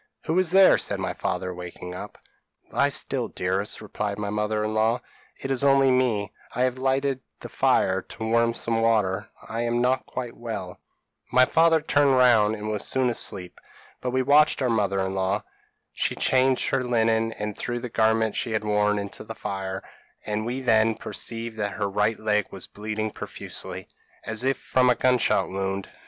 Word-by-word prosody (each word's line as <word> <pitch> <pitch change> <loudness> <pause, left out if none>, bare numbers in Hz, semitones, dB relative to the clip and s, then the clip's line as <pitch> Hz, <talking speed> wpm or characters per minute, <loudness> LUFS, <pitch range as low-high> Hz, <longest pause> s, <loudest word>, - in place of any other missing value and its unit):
p> 160 - -1
"'Who 180 - +3
is 185 -3 +3
there?' 190 +2 +6
said - - 0
my - - -2
father, 90 0 -3
waking 90 0 -8
up. 90 - -8 0.5
"'Lie - - +2
still, - - -2
dearest,' 95 +4 -2
replied 105 0 -3
my 105 -1 -3
mother 105 0 -1
in 110 0 -2
law; 110 +3 +2 0.4
'it 135 - -4
is 135 0 0
only 135 -1 +5
me; 120 -6 +1 0.2
I 125 - +2
have 130 0 0
lighted 135 0 +1 0.2
the - - -8
fire 95 0 +2
to 110 - -9
warm 115 +1 +2
some 115 -1 -1
water; 105 -4 +1 0.2
I 115 +1 -3
am 120 0 0
not 125 +2 +1
quite 125 -2 -5
well.' 100 -6 -6 0.5
"My 130 +2 +6
father 165 +2 +4
turned 145 -3 +3
round, 115 -4 +5
and 105 0 -6
was 105 - -2
soon 130 -2 +1
asleep; 90 -5 -5 0.4
but 125 - -2
we 130 +1 +1
watched 145 +3 +5
our 125 - +2
mother 100 -3 +1
in 95 - -3
law. 95 +2 0 0.5
She - - 0
changed 130 0 +2
her 135 -1 +1
linen, 115 -2 +1
and 105 -1 -4
threw 120 0 -3
the 125 - -5
garments 110 -1 +1
she 115 - -2
had 110 - 0
worn 105 0 +2
into 100 -1 -6
the 110 +1 -8
fire; 95 -2 -4 0.4
and 105 +1 -2
we 125 +2 -3
then 110 -2 +3
perceived 115 0 -5
that 100 -1 -1
her 105 - -1
right 105 +3 +1
leg 105 -1 +1
was 95 - -6
bleeding 110 +1 -4
profusely, - - -7 0.4
as 110 +2 -4
if 135 0 +2
from 130 -1 +2
a 125 - +4
gun 125 +1 +3
shot - - +1
wound. 95 0 -3
110 Hz, 190 wpm, -25 LUFS, 105-125 Hz, 0.5 s, there